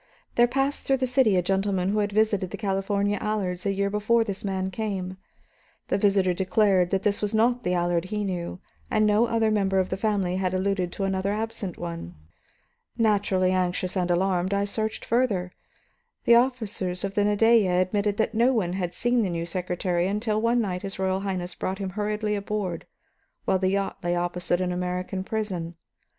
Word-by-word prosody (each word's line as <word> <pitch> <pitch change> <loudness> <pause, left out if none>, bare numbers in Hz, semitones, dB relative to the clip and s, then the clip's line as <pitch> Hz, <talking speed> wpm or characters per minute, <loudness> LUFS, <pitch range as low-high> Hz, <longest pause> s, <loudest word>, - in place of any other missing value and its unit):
There 240 0 +5
passed 270 +3 -1
through 270 - +3
the 260 - 0
city 250 -5 +3
a 180 - +2
gentleman 195 0 0
who 210 +1 +1
had 205 0 0
visited 205 -3 +1
the - - -6
California 200 0 0
Allards 200 -3 -2
a - - +2
year 200 0 0
before 215 +3 +2
this 200 -3 -5
man 190 -1 -2
came 195 -2 -3
here. 185 - -10 0.7
The - - +1
visitor 195 -2 +3
declared 185 0 +2
that 195 0 0
this 205 -1 +1
was 210 +1 -1
not 240 +2 +2
the 180 0 0
Allard 175 0 +1
he 210 +2 -2
knew, 180 -2 -4 0.3
and 215 -1 +2
no 210 +3 +4
other 225 -1 +1
member 195 -2 +1
of 185 -1 +1
the 190 - -2
family 195 -3 0
had 185 -1 -1
alluded 185 -2 0
to 195 - -3
another 190 0 0
absent 210 -4 -3
one. 170 - -6 0.8
Naturally 200 -4 +2
anxious 185 0 -1
and 180 -2 0
alarmed, 185 +1 +1
I 200 0 +1
searched 220 +2 -3
further. 215 -7 +1 0.7
The 235 - +6
officers 220 -7 +1
of 195 0 -2
the 205 - +2
Nadeja 210 -1 +4
admitted 200 +2 0
that 220 0 0
no 240 +4 +3
one 185 -7 0
had 180 -2 -3
seen 240 0 +2
the 200 - 0
new 170 -1 -2
secretary 180 0 -1
until 210 +2 0
one 235 +1 +2
night 180 -4 -2
his 195 0 -6
Royal 190 0 0
Highness 185 -2 -3
brought 190 +1 -3
him 195 -2 -4
hurriedly 210 +1 -1
aboard, 200 -4 -3 0.6
while 190 - +2
the 185 0 +1
yacht 195 0 -1
lay 175 0 0
opposite 175 0 -1
an 180 -1 0
American 180 +1 -3
prison. 190 -6 -3
195 Hz, 190 wpm, -26 LUFS, 185-215 Hz, 0.8 s, The